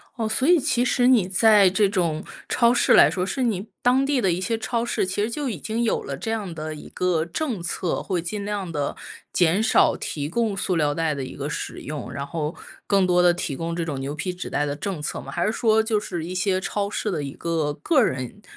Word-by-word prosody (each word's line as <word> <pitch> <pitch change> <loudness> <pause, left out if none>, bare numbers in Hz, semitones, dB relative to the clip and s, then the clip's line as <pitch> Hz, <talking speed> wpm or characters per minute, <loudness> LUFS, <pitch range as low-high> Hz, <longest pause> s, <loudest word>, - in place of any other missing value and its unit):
哦， 225 -3 -1
所 260 +6 0
以 350 -2 +6
其 245 -2 +1
实 245 0 +2
你 230 -8 +4
在 205 0 +5
这 200 +2 +3
种 170 -6 -1 0.3
超 235 0 +4
市 - - +3
来 - - +8
说， 180 - -2
是 255 +7 -2
你 215 -3 -1 0.2
当 255 +2 +4
地 280 -2 +1
的 190 -5 +2
一 180 +2 -1
些 225 +4 -1
超 230 +1 -1
市， 235 - 0
其 190 +2 -2
实 215 - 0
就 285 +3 -3
已 185 -9 -4
经 225 +6 -2
有 225 - +1
了 140 -1 -5
这 225 - -4
样 205 -6 -3
的 155 0 -5
一 150 - -10
个 180 -3 0
政 230 - -3
策， 170 0 -2
会 185 -3 -2
尽 200 +4 -4
量 200 -4 -3
地 145 -2 -2 0.4
减 180 +4 +3
少 220 - +4
提 145 -1 -4
供 215 +2 -1
塑 185 -1 0
料 150 -2 +2
袋 160 -2 0
的 140 -2 -4
一 130 - -7
个 140 +1 -4
使 - - -5
用， 150 -3 -6
然 140 - -4
后 155 +1 -3 0.3
更 195 -2 +3
多 180 0 +3
地 175 0 +6
提 150 -5 -3
供 165 +2 -3
这 170 -1 -2
种 140 -4 -4
牛 140 +2 -4
皮 180 +4 -3
纸 180 - -6
袋 145 - 0
的 145 0 -2
政 180 +2 -4
策 150 - -4
吗？ - - -9
还 - - -1
是 215 - +2
说 220 -1 +3
就 220 -2 +1
是 175 -5 -5
一 180 - -5
些 185 0 +1
超 200 +1 -2
市 210 0 -2
的 155 -4 -2
一 140 - -5
个 160 -3 -1
个 300 -6 +4
人 130 - -3
185 Hz, 270 characters per minute, -24 LUFS, 160-220 Hz, 0.4 s, 来